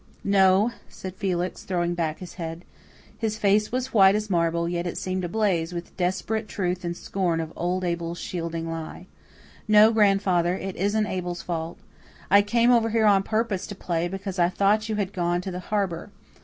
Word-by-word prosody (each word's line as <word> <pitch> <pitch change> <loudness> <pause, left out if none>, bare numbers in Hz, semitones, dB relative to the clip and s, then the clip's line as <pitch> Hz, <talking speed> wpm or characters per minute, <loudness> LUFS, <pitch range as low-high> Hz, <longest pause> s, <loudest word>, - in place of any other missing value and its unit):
"No," 195 +2 +4 0.2
said 185 -1 -8
Felix, 185 -2 -2
throwing 175 -2 -1
back 160 -3 -2
his 180 - -9
head. 165 0 -6 0.5
His 220 -2 -1
face 210 0 +2
was 255 +1 0
as - - -22
white 195 -2 +6
as 210 -1 -2
marble, 170 -1 +1
yet 175 0 -2
it 175 - -4
seemed 185 0 -2
ablaze 180 -3 0
with 170 0 -7
desperate 195 +4 -1
truth 180 -3 -2
and 170 0 -3
scorn 180 -4 -1
of 160 0 -5
old 180 +2 -1
Abel's 170 -1 -2
shielding 165 -2 -4
lie. 165 +2 -6 0.6
"No, 215 +1 +7
grandfather, 195 -5 +3
it 190 0 -5
isn't 205 +3 +1
Abel's 180 -2 -4
fault. 165 -1 -4 0.5
I 200 +1 +8
came 235 +4 +3
over 230 -2 +4
here 225 0 +2
on 200 -2 +5
purpose 215 -2 -1
to 205 - -7
play, 175 -2 -1
because 195 0 -5
I 175 0 +4
thought 205 +4 +1
you 215 - 0
had 200 -2 -2
gone 175 -1 0
to 190 +1 -5
the 180 - -5
harbour. 190 -3 -2
185 Hz, 185 wpm, -25 LUFS, 175-205 Hz, 0.6 s, I